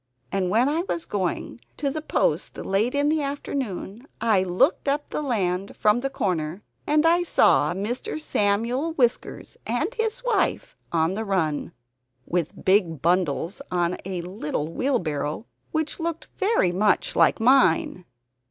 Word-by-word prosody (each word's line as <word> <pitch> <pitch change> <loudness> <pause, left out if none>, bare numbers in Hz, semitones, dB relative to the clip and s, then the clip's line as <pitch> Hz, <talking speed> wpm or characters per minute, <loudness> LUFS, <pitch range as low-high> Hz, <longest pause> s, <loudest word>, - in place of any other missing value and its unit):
And 190 -2 0
when 230 +7 +3
I 310 +4 +1
was 335 - -2
going 200 +4 -3 0.2
to 280 -1 -1
the 310 - -4
post - - 0
late 215 +7 0
in 285 +1 +2
the 310 0 +1
afternoon 270 -5 -4
I 220 -4 +3
looked 185 - +1
up 290 +1 -1
the - - -2
land 195 -8 -1
from 210 +2 +3
the 275 +2 -2
corner, 180 - -2 0.2
and 300 +1 +3
I 340 +2 +4
saw 150 - +3
Mr. 230 +9 -3
Samuel 240 +5 0
Whiskers 245 -6 -1
and 295 - -1
his 450 +1 -2
wife - - 0 0.2
on 165 +1 +1
the 220 +3 -3
run, 165 -8 -1 0.5
with 170 -2 -3
big 185 -6 +2
bundles 175 - 0
on 175 0 0
a 185 -2 -4
little 165 -4 -3
wheelbarrow, 165 - -1 0.3
which 315 0 -2
looked 330 0 -4
very 390 - +2
much 205 +4 +1
like - - +4
mine. 225 -7 +3
215 Hz, 145 wpm, -24 LUFS, 180-285 Hz, 0.5 s, I